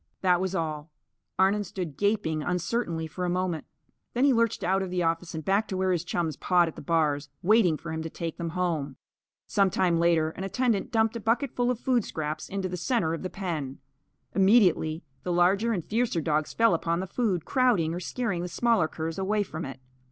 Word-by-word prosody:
That 180 -2 +3
was 190 0 -1
all. 155 -2 -3 0.5
Arnon 195 +2 +3
stood 175 -5 -5
gaping 200 -7 0
uncertainly, 170 0 -1
for 170 +3 -6
a 180 - 0
moment. 180 -3 -1 0.5
Then 250 +3 +3
he 280 - +5
lurched 230 -2 +1
out 190 +2 +2
of 190 - -3
the 180 -1 -1
office 165 +1 -1
and 155 - -5
back 200 +3 +2
to 190 - -3
where 185 0 +1
his 175 -2 0
chums 170 -3 -2
pawed 175 -2 +3
at 165 - -6
the - - -8
bars, 145 -2 0
waiting 190 -5 +4
for 165 +1 -7
him 160 0 -3
to 160 - -4
take 165 0 -5
them 170 -1 -2
home. 155 -7 -1 0.5
Some 195 -1 +2
time 180 -4 +1
later, 165 -2 +3
an 185 - -7
attendant 215 +2 0
dumped 225 -1 +2
a - - -6
bucketful 240 +2 0
of 250 -2 -1
food 245 -4 +1
scraps 155 -3 -4
into 195 -1 -2
the 180 0 -4
centre 175 -2 0
of 165 - -4
the 185 - -4
pen. 160 -9 -4 0.6
Immediately 190 -6 +3 0.2
the 180 - -3
larger 190 +6 +3
and 180 -8 -2
fiercer 225 -5 0
dogs 155 -1 0
fell 230 -4 +3
upon 170 0 0
the 190 - -2
food, 190 -4 -1
crowding 225 -12 +2
or 175 - -3
scaring 200 -1 -2
the 180 - -3
smaller 220 -1 +2
curs 160 +2 -5
away 205 +2 +1
from 160 -3 -6
it. 135 -1 -8
180 Hz, 210 wpm, -27 LUFS, 165-205 Hz, 0.6 s, he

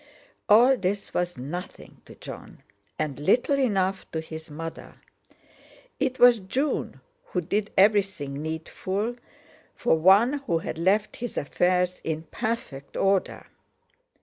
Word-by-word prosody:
All 245 +5 +7
this 200 0 -3
was 175 -3 -1
nothing 155 +9 -8
to - - -13
Jon, - - -11 0.3
and 145 -3 -3
little 245 - +2
enough 195 -7 0
to 160 - -1
his 160 0 -8
mother. 165 +2 -8 1.0
It 255 - 0
was 245 -2 +7
June 260 +10 -2 0.2
who 180 - -2
did 205 +5 -1
everything 190 -9 +2
needful 185 +8 -3 0.6
for 240 - +2
one 205 - +5
who 170 - +2
had 160 0 -5
left 200 +5 +1
his 245 -1 -6
affairs 180 +4 +1
in 160 0 -3
perfect 220 - -4
order. 195 -1 +1
190 Hz, 120 wpm, -26 LUFS, 160-215 Hz, 1.0 s, All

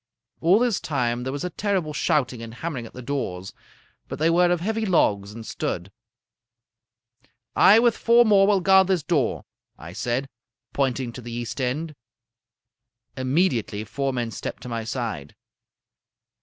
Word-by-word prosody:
All 175 +5 +4
this 240 -3 +1
time 120 -5 -1
there 130 +1 -3
was 140 +1 -4
a 180 - -3
terrible 190 -6 -1
shouting 125 -5 0
and 115 0 -8
hammering 130 -5 -5
at - - -16
the 125 - -9
doors, 95 -9 -4 0.5
but - - -6
they 160 +2 +2
were 175 +1 +4
of 175 - +1
heavy 220 +5 -2
logs 105 - +1
and 110 +1 -9
stood. 90 -2 -4 1.6
"'I 205 - +7
with 235 -1 +4
four 235 +1 +5
more 200 -3 +5
will 200 -2 +3
guard 190 0 +5
this 185 -5 +1
door,' 145 -8 0 0.3
I 85 +2 -10
said, 125 +7 -2 0.5
pointing 130 -3 -1
to 125 - -8
the 120 0 -8
east 120 +3 -4
end. 150 +6 -2 1.2
"Immediately 130 - 0
four 135 +6 -2
men 120 -3 -3
stepped 95 - -6
to - - -7
my 115 -1 -3
side. 115 - -4
135 Hz, 155 wpm, -24 LUFS, 120-180 Hz, 1.6 s, I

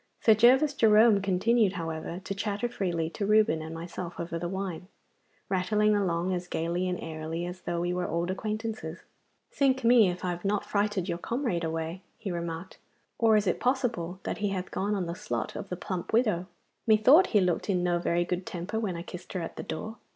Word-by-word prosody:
Sir 220 - +6
Gervas 255 +7 +5
Jerome 220 -3 +5
continued, 200 +2 +2
however, 165 0 -4
to 195 - -3
chatter 205 +3 -2
freely 175 -8 -2
to 205 - -4
Reuben 210 -7 +4
and 160 0 -6
myself 170 +1 -6
over 170 0 -3
the 175 +1 -3
wine, 190 -2 -4 0.6
rattling 210 +3 +2
along 185 -2 0
as 180 0 -3
gaily 175 +2 -1
and 180 - -1
airily 160 +1 -4
as 180 +1 -7
though 170 0 -2
we 175 +1 0
were 180 0 -1
old 170 +3 -1
acquaintances. 215 -4 -4 0.5
'Sink 265 -1 +2
me, 230 -4 +6
if 180 +1 -4
I 180 - 0
have 175 0 -6
not 205 0 0
frighted 205 -3 0
your 170 -2 -2
comrade 235 -6 -1
away!' 165 +2 -3 0.2
he 200 - -5
remarked, 170 +1 -5 0.4
'Or 225 -2 +5
is 210 - +1
it 180 - 0
possible 230 -9 -1
that - - -3
he 205 -1 0
hath 190 -1 -4
gone 205 +2 -1
on 190 -3 -1
the 170 - -3
slot 210 +4 -4
of 195 - -6
the 180 - -4
plump 180 -1 -4
widow? 210 -7 +2 0.4
Methought 240 - +6
he 210 - +3
looked 180 +1 0
in 180 -3 +1
no 175 -1 +1
very 170 0 +1
good 180 +1 -3
temper 205 +1 -3
when 200 -6 -2
I 170 - -5
kissed 180 0 -9
her 185 - -2
at - - -6
the - - -5
door. 220 +7 -6
185 Hz, 205 wpm, -28 LUFS, 175-215 Hz, 0.6 s, Sir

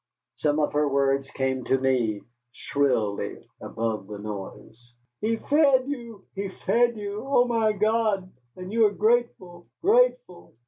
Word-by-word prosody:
Some 150 0 +1
of 150 - 0
her 150 0 +2
words 135 0 +1
came 130 -1 -2
to 130 - +2
me, 125 -6 0 0.3
shrilly, 125 -7 -1 0.2
above 110 -3 -3
the 105 - -7
noise. 110 +3 -9 0.3
"He 225 +2 0
fed 275 0 +3
you 235 -7 -7
he 195 0 -4 0.2
fed 235 -1 +3
you. 205 0 -5
Oh, 270 -2 +3
my 225 -3 +1
God, 210 -2 0 0.2
and 185 +2 -8
you 225 -1 +5
are - - -3
grateful 210 -6 0 0.2
grateful! - - +1
190 Hz, 140 wpm, -25 LUFS, -, 0.3 s, you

